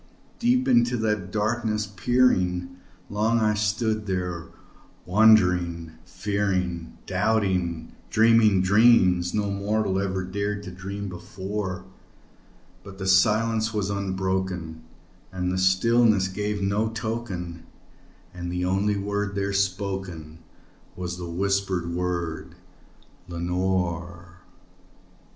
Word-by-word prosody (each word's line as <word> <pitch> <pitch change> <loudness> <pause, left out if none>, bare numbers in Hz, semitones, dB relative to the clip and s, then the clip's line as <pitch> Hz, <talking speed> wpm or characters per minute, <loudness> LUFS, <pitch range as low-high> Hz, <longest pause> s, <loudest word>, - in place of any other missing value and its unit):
Deep 250 +2 +2
into 120 +1 +3
that 105 -4 -1
darkness 110 0 0
peering, 95 -5 +1 0.3
long 110 +3 +1
I 105 -1 +2
stood 105 +1 -1
there 90 -3 -3 0.6
wondering, 90 -5 +3
fearing, 90 -3 -2
Doubting, 95 -5 0 0.2
dreaming 110 -3 +4
dreams 95 -4 +4
no 105 -1 0
mortal 100 -1 0
ever 95 -1 -2
dared 100 +2 -3
to 90 - -7
dream 100 +3 -6
before; 95 +1 -5 1.0
But 95 0 -11
the 95 - -5
silence 110 +3 +3
was 100 -2 -1
unbroken, 95 -4 -2 0.5
and 90 -1 -2
the 95 0 +3
darkness 115 -5 +4
gave 105 +1 -3
no 105 +3 +1
token, 110 -7 -5 0.7
And 90 -1 -5
the 90 0 -1
only 100 +3 +1
word 100 0 -2
there 100 0 -1
spoken 95 -5 -3 0.6
was 90 -1 -5
the 85 -1 -6
whispered 95 -1 -1
word, 85 -2 -3 0.7
"Lenore!" 85 0 -2
95 Hz, 100 wpm, -25 LUFS, 90-105 Hz, 1.0 s, dreaming